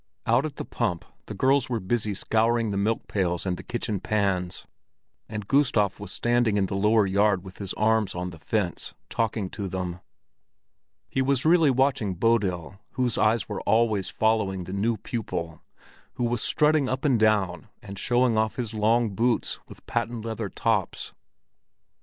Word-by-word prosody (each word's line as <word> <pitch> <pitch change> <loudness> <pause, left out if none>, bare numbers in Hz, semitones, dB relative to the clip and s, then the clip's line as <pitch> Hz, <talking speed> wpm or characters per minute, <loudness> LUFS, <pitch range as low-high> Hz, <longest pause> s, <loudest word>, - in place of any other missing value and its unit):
Out 120 +6 +3
at 150 - -10
the - - -5
pump 85 -2 -2 0.2
the - - -6
girls 135 0 +2
were 120 -2 -1
busy 105 +1 -1
scouring 115 +2 +1
the - - -2
milkpails 100 -4 -1
and 90 -2 -3
kitchen 110 -4 -2
pans; 95 -4 -1 0.6
and 105 -2 -5
Gustav 115 -9 +2
was 105 - -7
standing 120 -3 +1
in 100 - +2
the 95 - -5
lower 105 +2 +3
yard 100 -1 +2
with 95 -1 -12
his 100 -2 -4
arms 110 -2 +1
on 90 0 -3
the 85 - -12
fence, 95 0 -2 0.2
talking 110 -3 -1
to 100 -2 -4
them. 90 -1 -4 1.1
He 130 - -1
was 135 0 +1
really 165 -2 +5
watching 130 -7 +1
Bodil, 95 -3 0
whose 125 -3 0
eyes 110 +1 +2
were 105 -3 -4
always 110 -4 +2
following 110 -4 +1
the 95 - -7
new 110 +3 0
pupil, 95 -7 -4 0.5
who 125 - -3
was 120 -1 0
strutting 150 -3 +2
up 130 +3 -2
and 130 -6 +3
down 105 -4 +2 0.2
and 100 -1 -8
showing 120 -1 +2
off 110 0 0
his 115 -3 -4
long 110 +1 +2
boots 120 +4 0
with - - -14
patent 115 -1 -2
leather 110 -2 -3
tops. 110 -3 -1
110 Hz, 165 wpm, -26 LUFS, 95-120 Hz, 1.1 s, really